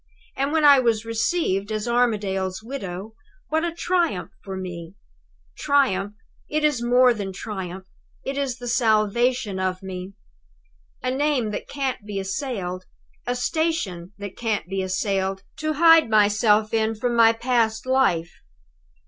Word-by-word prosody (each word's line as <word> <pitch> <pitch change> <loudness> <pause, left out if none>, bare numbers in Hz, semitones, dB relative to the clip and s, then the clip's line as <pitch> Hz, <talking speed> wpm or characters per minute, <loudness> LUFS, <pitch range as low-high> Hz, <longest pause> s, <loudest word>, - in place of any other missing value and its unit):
And 275 +2 -1
when 315 -1 +2
I 285 -2 +8
was 230 -3 +1
received 225 - 0
as 215 +1 -2
Armadale's 205 -5 0
widow 215 -5 -6 0.4
what 315 +1 +1
a 345 - 0
triumph 340 - -1
for 190 -1 -6
me. 175 -1 -7 0.6
Triumph! 210 -8 +1 0.3
It 305 0 -1
is 295 -5 +2
more 245 +1 +5
than 200 -4 -5
triumph 190 -2 -6 0.4
it 270 - -3
is 275 -3 -2
the 245 - -8
salvation 230 -2 +1
of 185 0 -2
me. 185 0 -7 0.9
A 255 - 0
name 270 -5 0
that - - -5
can't 270 -5 -3
be 205 -1 -4
assailed, 190 -4 -4 0.4
a 245 - 0
station 245 - -2
that 200 -1 -7
can't 220 -7 -2
be 195 +1 -2
assailed, 190 0 -1
to 310 0 -1
hide 325 -2 +6
myself 215 0 +3
in 220 0 +1
from 240 +2 -1
my 230 -1 +7
past 230 -1 0
life! 215 -11 +1
220 Hz, 140 wpm, -23 LUFS, 195-260 Hz, 0.9 s, I